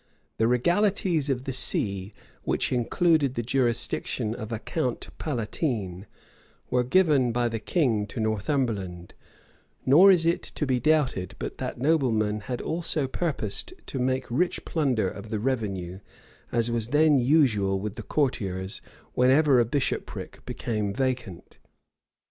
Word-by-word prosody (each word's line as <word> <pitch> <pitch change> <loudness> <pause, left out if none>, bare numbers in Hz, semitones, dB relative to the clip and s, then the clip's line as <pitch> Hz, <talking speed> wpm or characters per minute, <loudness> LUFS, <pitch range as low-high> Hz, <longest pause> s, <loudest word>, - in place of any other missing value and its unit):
The 110 - +3
regalities 175 - +2
of 130 -2 -1
the 135 - -4
see, 100 -6 0 0.3
which - - -1
included 140 +3 +2
the 120 - -1
jurisdiction 120 -3 0
of 110 -1 -7
a 115 - -1
count 125 +1 -3
palatine, 110 - -3 0.6
were 125 0 +3
given 140 -3 +3
by 120 +1 +1
the 115 -1 -3
king 115 - +1
to 115 - -7
Northumberland; 110 - -2 0.7
nor 165 +9 +7
is 170 -3 +3
it 170 +1 +2
to 150 - -4
be 130 -2 +1
doubted 145 - +1
but - - -6
that - - -4
noblemen 120 -8 +1
had 120 +4 -5
also 160 -3 -1
purposed 155 - -2
to 135 - -5
make 130 +1 0
rich 175 +9 0
plunder 130 - +1
of 100 +3 -7
the 110 - -1
revenue, 100 -7 -2 0.5
as 115 0 +1
was 115 -2 -1
then 150 +1 +4
usual 120 -8 +3
with 105 +1 -4
the 115 - -7
courtiers 100 -7 -2 0.3
whenever 130 +2 +4
a 120 - +4
bishopric 135 +4 -3
became 105 -3 -2
vacant. 125 -6 -3
125 Hz, 135 wpm, -26 LUFS, 105-145 Hz, 0.7 s, nor